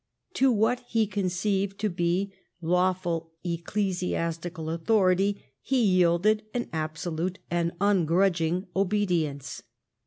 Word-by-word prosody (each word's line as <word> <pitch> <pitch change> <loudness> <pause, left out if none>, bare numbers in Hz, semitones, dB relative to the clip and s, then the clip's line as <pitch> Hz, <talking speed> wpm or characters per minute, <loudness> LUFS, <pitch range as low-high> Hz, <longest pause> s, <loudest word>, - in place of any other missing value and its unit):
To 265 0 +4
what 225 +2 +2
he 225 -1 +2
conceived 195 0 -1
to 215 - +2
be 180 +2 0 0.3
lawful 175 -1 0
ecclesiastical 170 -2 -2
authority 195 +3 +2 0.2
he 265 -1 +1
yielded 185 +2 +3
an 240 - -2
absolute 160 +3 -3
and 170 -1 +1
ungrudging 180 -2 +2
obedience. 175 -9 0
180 Hz, 95 wpm, -27 LUFS, 170-200 Hz, 0.3 s, To